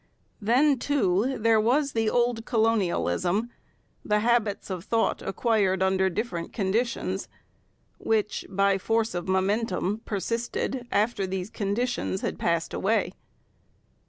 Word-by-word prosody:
Then, 260 +6 +3
too, 255 -2 +1
there 220 0 +3
was 275 +6 +2
the 225 -1 +1
old 240 -1 +1
colonialism, 220 -1 +1 0.5
the 210 0 +1
habits 225 -4 +1
of 180 -2 -4
thought 225 +2 0
acquired 195 -3 +1
under 190 0 +2
different 185 -3 -4
conditions, 195 -2 -1 0.7
which, 215 -1 0
by 195 0 +2
force 225 +3 0
of 175 0 -4
momentum, 195 +2 0
persisted 235 +4 -3
after 205 -1 +1
these 185 +1 -4
conditions 210 0 -2
had - - -3
passed 170 -1 0
away. 195 -3 0
215 Hz, 115 wpm, -26 LUFS, 190-235 Hz, 0.7 s, Then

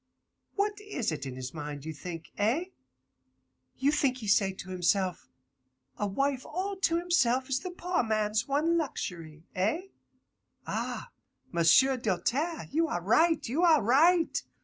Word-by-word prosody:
What 415 0 0
is 350 - -3
it 145 -3 -4
in 130 - -6
his 130 0 -6
mind, 150 -2 -6
you 160 - -4
think? 165 +2 -8
Eh? 255 - 0 1.1
You 275 +2 +2
think 275 -4 +1
he 225 -4 -7
say 195 -1 +3
to 185 0 -9
himself, 185 0 0 0.7
A 205 - 0
wife 270 +6 -1
all 390 +2 -3
to 335 -3 +1
himself 265 -8 +2
is 260 -1 +1
the 365 - -6
poor 360 0 -1
man's 215 0 0
one 315 +5 +2
luxury? 165 - -5
Eh? 220 - -1 0.8
Ah, - - -4 0.4
M'sieu' 185 +11 +5
Doltaire, 250 - -1
you 325 +3 +2
are 245 - -2
right, 315 - +3
you 270 +9 0
are 330 -4 +5
right. 325 - +4
255 Hz, 150 wpm, -29 LUFS, -, 1.1 s, M'sieu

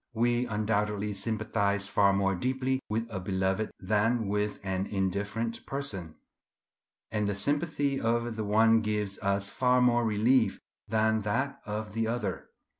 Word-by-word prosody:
We 120 +2 +2
undoubtedly 105 -1 0
sympathize 100 -1 -1
far 100 -1 +4
more 95 0 +2
deeply 130 +5 0
with 110 +2 -1
a 95 - -3
beloved 95 +3 -1
than 110 +3 +1
with 105 0 -1
an 95 0 -2
indifferent 100 +4 -2
person; 100 - -4 1.0
and 105 -2 0
the 100 - -1
sympathy 145 - 0
of 115 0 0
the 110 - -2
one 110 +2 +4
gives 105 -2 -2
us 100 0 0
far 125 -1 +2
more 120 -1 +4
relief 115 +3 +2 0.3
than 110 0 +2
that 135 +7 -1
of 105 0 -4
the 115 0 0
other. 115 -1 -3
110 Hz, 140 wpm, -29 LUFS, 100-120 Hz, 1.0 s, far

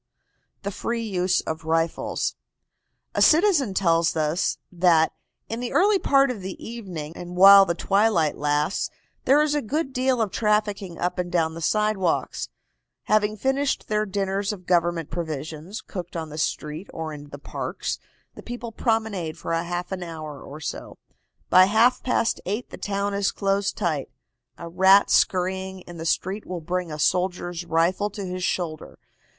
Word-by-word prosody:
THE 200 - -2
FREE 230 +3 -3
USE 185 -3 +1
OF 160 0 -5
RIFLES. 165 +1 0 0.8
A - - 0
citizen 315 - +4
tells 165 -3 +2
us 155 +3 0
that 170 -3 +3 0.3
"in 225 - -4
the 245 0 -4
early 400 +2 +4
part 275 -4 +3
of 220 -6 -6
the 190 0 -6
evening, 185 -10 -7
and 175 0 -8
while 195 +1 +9
the 170 - 0
twilight 195 -5 +2
lasts, 150 +4 0 0.4
there 285 +3 +5
is 300 -1 0
a 295 - +1
good 280 +4 -2
deal 255 0 +1
of 215 -4 0
trafficking 210 -4 0
up 180 +1 -2
and 175 -1 -2
down 165 -3 +1
the 165 - -7
sidewalks. 210 -1 0 0.5
Having 215 0 +2
finished 270 +3 0
their 215 0 +1
dinners 195 +1 -1
of 185 -4 -8
government 170 -3 +1
provisions, 160 +3 -5
cooked 175 -3 -7
on 160 -1 -4
the 155 +1 -7
street 155 +3 -3
or 160 -1 -5
in 145 -1 -10
the 145 - -8
parks, 145 - -4 0.3
the - - -11
people 240 -1 -6
promenade 220 -8 -1
for - - -4
half 175 +2 -2
an 190 -1 -3
hour 155 -4 -7
or 145 +2 -9
so. 155 - -6 0.5
By 185 0 +8
half 225 +5 +3
past 230 -2 0
eight 210 +6 -3
the - - -8
town 200 0 -2
is 200 0 +1
closed 200 0 0
tight. 155 -5 -1 0.5
A 170 - -7
rat 190 +4 +5
scurrying 190 +1 +1
in 175 -1 -11
the 165 0 -4
street 195 +5 -1
will 180 -1 -4
bring 175 +1 -3
a 150 - -5
soldier's 175 +1 0
rifle 170 +5 +1
to 200 -1 -6
his 180 0 -4
shoulder. 165 -4 -3
185 Hz, 165 wpm, -24 LUFS, 165-210 Hz, 0.8 s, while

